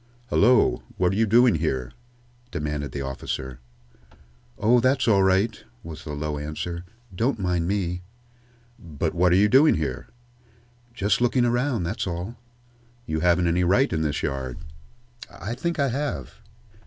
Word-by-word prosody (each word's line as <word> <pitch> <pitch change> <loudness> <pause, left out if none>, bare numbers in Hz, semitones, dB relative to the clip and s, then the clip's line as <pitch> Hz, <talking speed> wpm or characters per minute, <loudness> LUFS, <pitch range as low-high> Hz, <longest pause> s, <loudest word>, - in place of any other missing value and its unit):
"Hullo! 125 -2 +4 0.2
What 90 -1 +2
are - - -2
you 110 +2 +2
doing 120 +2 +5
here?" 65 -6 -2 0.6
demanded 75 -4 -3
the 70 - -4
officer. 65 -1 -5 1.0
"Oh, 120 +4 +4
that's 130 +2 +2
all 100 -4 +5
right," 95 +4 +2 0.2
was 80 0 -9
the 75 - -5
low 75 0 -3
answer. 85 +4 -5 0.3
"Don't 115 +7 0
mind 90 -4 -1
me." 90 -3 -1 0.8
"But 80 -1 -3
what 90 +1 +3
are - - +5
you 100 +3 +5
doing 135 +8 +5
here?" 80 -3 -3 0.9
"Just 100 +1 +1
looking 120 0 +3
around, 120 -3 0
that's 85 - -3
all." 90 +6 -4 0.7
"You 80 0 -2
haven't 85 +1 +3
any 85 +1 +2
right 100 +7 +3
in 80 - 0
this 75 -1 -1
yard." 65 -2 -3 0.7
"I 105 +5 -6
think 170 +7 -3
I 140 -2 +1
have." 140 0 -4
90 Hz, 150 wpm, -24 LUFS, 80-115 Hz, 1.0 s, doing